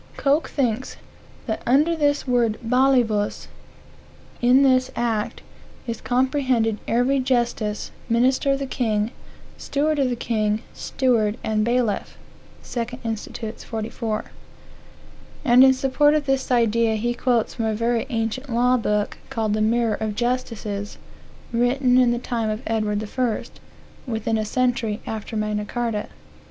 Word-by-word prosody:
Coke 290 +3 +1
thinks 255 -3 -1 0.5
"that 220 -3 -3
under 300 +7 +4
this 290 -3 +1
word 235 -3 +2
balivus, 240 -4 +2 0.9
in 250 +3 +5
this 255 -1 +3
act, 225 -3 -2 0.4
is 230 -2 -4
comprehended 255 -3 +1
every 250 +4 +2
justice, 240 -5 -1 0.2
minister 255 +4 +3
of - - 0
the 275 - -3
king, 220 -4 -1 0.5
steward 300 +1 0
of 265 -2 +2
the 245 - -1
king, 215 -1 -1
steward 230 -5 0
and 215 -1 +1
bailiff." 235 -3 0 0.5
(2 245 0 -3
Inst. 225 -2 -4 0.3
44.) 220 -1 -3 1.2
And 250 0 +7
in 265 - +8
support 270 +3 +3
of 300 -2 0
this 270 -1 0
idea 230 -2 +3
he 240 +3 -1
quotes 240 -2 0
from 225 - -2
a 220 -1 0
very 230 +2 0
ancient 230 +3 -2
law 250 +2 +3
book, 210 -3 -1
called 220 -2 -1
the 215 - 0
Mirror 230 0 +2
of 215 -1 -2
Justices, 225 -4 -3 0.6
written 250 +2 +3
in 250 -1 +5
the 240 - +1
time 235 -2 -2
of 215 +1 -3
Edward 215 -1 -1
I., 245 -3 +1 0.7
within 225 -1 -1
a 215 - -1
century 240 -2 0
after 220 0 -5
Magna 210 0 -1
Carta. 225 -1 -2
235 Hz, 135 wpm, -23 LUFS, 220-255 Hz, 1.2 s, in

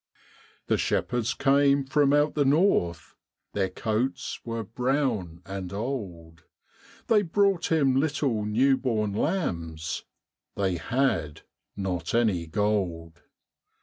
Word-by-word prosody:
The - - +1
shepherds 120 -2 0
came 140 0 +3
from 140 +1 +3
out 145 +1 +3
the 145 - +2
north, 135 - +1 0.4
Their 95 -2 0
coats 110 +7 -2
were 115 -1 -4
brown 115 - -1
and 95 -2 -6
old, 95 -8 -5 0.6
They 215 -2 +4
brought 195 -1 +1
Him 140 -5 +3
little 135 -6 0
new 130 +6 +3
born 110 -6 -1
lambs 85 - -2 0.5
They 95 -3 0
had 85 - -1 0.4
not 90 -1 -2
any 100 -8 +1
gold. 85 -4 -1
115 Hz, 110 wpm, -27 LUFS, 90-140 Hz, 0.6 s, They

